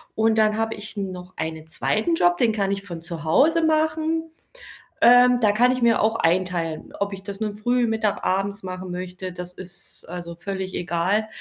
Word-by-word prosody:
Und 220 Hz, 0 st, +3 dB
dann 215 Hz, 0 st, +3 dB
habe 225 Hz, 0 st, -1 dB
ich 210 Hz, +1 st, -9 dB
noch 185 Hz, -2 st, -5 dB
einen 160 Hz, 0 st, -4 dB
2. 220 Hz, -, 0 dB
Job, 175 Hz, -, +3 dB
den 235 Hz, -2 st, +3 dB
kann 200 Hz, -2 st, 0 dB
ich 195 Hz, 0 st, -2 dB
von 170 Hz, -4 st, -7 dB
zu 165 Hz, -2 st, -7 dB
Hause 310 Hz, -, +4 dB
machen. 315 Hz, +1 st, +1 dB, 0.7 s
Ähm, 245 Hz, +1 st, +7 dB
da 210 Hz, -2 st, +5 dB
kann 245 Hz, +4 st, +4 dB
ich 255 Hz, -, -3 dB
mir 235 Hz, -1 st, +4 dB
auch 220 Hz, +1 st, +2 dB
einteilen, 170 Hz, -4 st, -1 dB
ob 200 Hz, 0 st, -1 dB
ich 195 Hz, -1 st, -8 dB
das 200 Hz, +1 st, -7 dB
nun 210 Hz, -1 st, -2 dB
früh, 240 Hz, +2 st, +1 dB
mittag, 220 Hz, -2 st, -1 dB
abends 195 Hz, +2 st, -1 dB
machen 185 Hz, 0 st, -6 dB
möchte, 180 Hz, +1 st, -6 dB
das 180 Hz, 0 st, -7 dB
ist 180 Hz, -1 st, -6 dB
also 170 Hz, -1 st, -6 dB
völlig 190 Hz, +1 st, -5 dB
egal. 180 Hz, +5 st, 0 dB
200 Hz, 190 wpm, -23 LUFS, 180-225 Hz, 0.7 s, Ähm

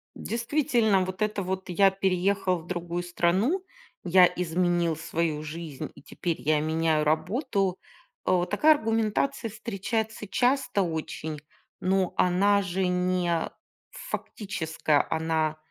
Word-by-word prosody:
Действительно, 235 Hz, -4 st, +1 dB
вот 185 Hz, +2 st, -6 dB
это 210 Hz, -2 st, 0 dB
вот 190 Hz, +1 st, -4 dB
я 195 Hz, +2 st, +4 dB
переехал 190 Hz, -1 st, +1 dB
в 160 Hz, -, -14 dB
другую 175 Hz, 0 st, -3 dB
страну, 190 Hz, -, +1 dB, 0.4 s
я 180 Hz, 0 st, +6 dB
изменил 175 Hz, -1 st, 0 dB
свою 165 Hz, -1 st, -2 dB
жизнь, 155 Hz, -2 st, -6 dB
и -, -, -14 dB
теперь 170 Hz, +3 st, -4 dB
я 150 Hz, 0 st, +2 dB
меняю 160 Hz, 0 st, +1 dB
работу, 190 Hz, -, 0 dB, 0.5 s
э. 180 Hz, -1 st, +2 dB
Такая 305 Hz, +9 st, +5 dB
аргументация 225 Hz, +1 st, 0 dB
встречается 220 Hz, 0 st, -3 dB
часто 245 Hz, -2 st, +1 dB
очень, 160 Hz, -2 st, -4 dB, 0.4 s
но 185 Hz, 0 st, +1 dB
она 200 Hz, +3 st, +3 dB
же 190 Hz, -1 st, -1 dB
не 180 Hz, -2 st, 0 dB, 0.4 s
фактическая, 165 Hz, -, -2 dB
она 160 Hz, -1 st, 0 dB
185 Hz, 115 wpm, -27 LUFS, 165-205 Hz, 0.5 s, я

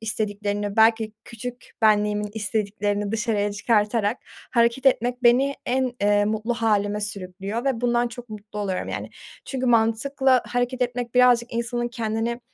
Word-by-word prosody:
istediklerini 205 Hz, -2 st, -2 dB
belki 220 Hz, -1 st, +4 dB
küçük 245 Hz, +2 st, -8 dB
benliğimin 210 Hz, -1 st, +2 dB
istediklerini 205 Hz, -1 st, -1 dB
dışarıya 210 Hz, -2 st, 0 dB
çıkartarak 210 Hz, +1 st, +1 dB, 0.3 s
hareket 235 Hz, +2 st, +2 dB
etmek 245 Hz, -1 st, +2 dB
beni 260 Hz, +3 st, +4 dB
en, 255 Hz, 0 st, 0 dB
eee, 205 Hz, 0 st, +3 dB
mutlu 220 Hz, +3 st, -1 dB
hâlime 210 Hz, -2 st, +1 dB
sürüklüyor 200 Hz, +2 st, -5 dB
ve 265 Hz, -4 st, 0 dB
bundan 240 Hz, 0 st, +1 dB
çok 240 Hz, 0 st, -10 dB
mutlu 210 Hz, 0 st, -9 dB
oluyorum, 195 Hz, -3 st, -2 dB
yani. -, -, -5 dB, 0.3 s
Çünkü 260 Hz, -2 st, -3 dB
mantıkla 245 Hz, +3 st, +3 dB
hareket 245 Hz, +1 st, -1 dB
etmek 245 Hz, -1 st, -3 dB
birazcık 245 Hz, -1 st, +4 dB
insanın 240 Hz, +1 st, -2 dB
kendini 230 Hz, 0 st, -2 dB
225 Hz, 135 wpm, -24 LUFS, 210-245 Hz, 0.3 s, belki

